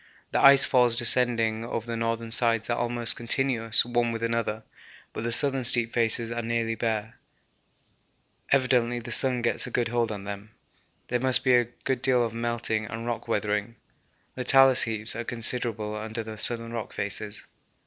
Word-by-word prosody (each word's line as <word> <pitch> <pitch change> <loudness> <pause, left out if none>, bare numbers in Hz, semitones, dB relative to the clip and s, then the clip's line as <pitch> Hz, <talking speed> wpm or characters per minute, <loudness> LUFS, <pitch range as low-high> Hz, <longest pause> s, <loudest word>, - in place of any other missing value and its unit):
The - - 0
ice 140 0 +7
falls 125 -3 +3
descending 115 -2 +2
over 115 -1 -5
the 115 -1 -5
northern 115 0 -3
sides 115 -1 +1
are - - +1
almost 120 -1 +1
continuous 120 -2 +3
one 120 -1 -1
with 115 0 -6
another, 115 -1 -3 0.5
but - - -6
the 120 - -2
southern 135 +1 +2
steep 120 -1 +3
faces 115 0 0
are 120 0 -3
nearly 115 0 -2
bare; 110 0 -4 1.3
evidently 125 -3 +1
the 120 0 -8
sun 125 0 +2
gets 120 - 0
a - - -6
good 120 -2 -2
hold 120 -2 -1
on 100 -2 -7
them. 100 +1 -8 0.6
There 125 - -1
must 130 0 +3
be 130 - +3
a 120 -1 +3 0.2
good 130 -2 -2
deal 125 -3 +2
of 115 - -6
melting 115 -2 -3
and 115 +2 -7
rock 120 -1 -5
weathering, 105 0 -2 0.6
the 125 - -6
talus 135 0 +5
heaps 110 -1 -1
are 120 - -4
considerable 115 -2 -1
under 110 +1 -6
the 110 0 -9
southern 115 0 0
rock 115 -2 -6
faces. 105 +1 -3
115 Hz, 175 wpm, -25 LUFS, 115-120 Hz, 1.3 s, ice